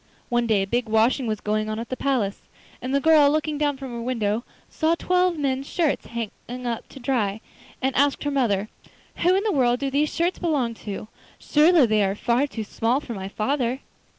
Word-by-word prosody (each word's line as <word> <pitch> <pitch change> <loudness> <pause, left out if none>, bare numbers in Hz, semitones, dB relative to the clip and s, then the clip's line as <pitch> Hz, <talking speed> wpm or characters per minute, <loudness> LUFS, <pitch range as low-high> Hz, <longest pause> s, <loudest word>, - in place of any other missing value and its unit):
One 240 -1 +1
day 210 -3 +3
a - - -2
big 235 +3 -1
washing 230 +4 +2
was 215 -1 -2
going 215 +1 -1
on 215 - -3
at 230 +1 -5
the 255 - -2
palace, 250 -8 -1 0.4
and 255 - -4
the 280 - +3
girl 305 -1 +6
looking 305 0 -1
down 290 -2 +1
from 265 -2 -7
her 235 0 -5
window 230 -2 -1 0.2
saw 320 +1 +1
twelve 360 0 +1
men's 275 -1 -1
shirts 325 -5 0
hanging 235 +2 -6
up 235 -2 -3
to - - -11
dry, 230 -6 0 0.4
and 265 0 +1
asked 285 +1 +2
her 290 - -1
mother: 215 -7 +1 0.5
'Who 360 +2 +3
in 390 - +1
the 435 - +1
world 245 -6 +2
do 275 -1 -2
these 295 +2 +1
shirts 345 +2 0
belong 285 -9 0 0.2
to? 205 +1 -5 0.3
Surely 310 -1 +4
they 215 -2 +2
are 195 0 0
far 240 +6 +1
too 225 -5 -5
small 230 +4 0
for 255 -5 -7
my 190 -2 -5
father? 250 +5 -1
255 Hz, 205 wpm, -24 LUFS, 225-290 Hz, 0.5 s, girl